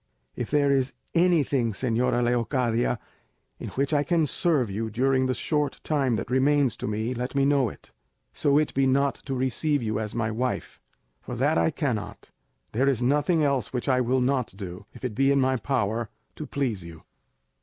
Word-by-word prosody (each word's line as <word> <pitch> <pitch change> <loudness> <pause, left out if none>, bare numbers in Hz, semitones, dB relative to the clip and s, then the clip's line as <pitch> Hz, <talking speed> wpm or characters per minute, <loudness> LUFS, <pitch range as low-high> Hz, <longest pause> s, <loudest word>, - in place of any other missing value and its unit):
If 120 - -4
there 145 -1 +3
is 135 -1 +1 0.2
anything, 145 -9 +2
señora 120 +2 +1
Leocadia, 120 0 +1 0.6
in - - -6
which 140 +3 0
I 145 - +4
can 165 +1 +2
serve 145 - +1
you 110 +3 -3
during 130 +3 +1
the 130 - 0
short 150 -2 -1
time 135 -6 +1
that 115 - -4
remains 135 -2 +3
to - - -4
me, 110 +3 -2
let 125 +2 -4
me 140 -1 +3
know 140 -4 +3
it; - - -15 0.4
so 140 0 +2
it 155 0 +1
be 135 0 +2
not 140 +1 +2
to 135 - -6
receive 130 +2 0
you 110 -1 -1
as 105 -1 -4
my 110 -2 0
wife, 125 +3 -3 0.4
for 125 - -6
that 145 +6 +2
I - - +3
cannot, 130 -9 -4 0.4
there 130 +5 +2
is 125 -3 0
nothing 150 +5 +2
else 140 -6 0
which 125 - -3
I 130 -2 +3
will 125 +1 +1
not 130 -1 0
do, 95 0 -8
if - - -9
it 120 - -2
be 135 +4 +3
in 140 - +3
my 130 0 +2
power, 115 -3 -1 0.3
to 155 - -7
please 120 -10 -2
you." 80 -1 -11
130 Hz, 190 wpm, -26 LUFS, 115-140 Hz, 0.6 s, I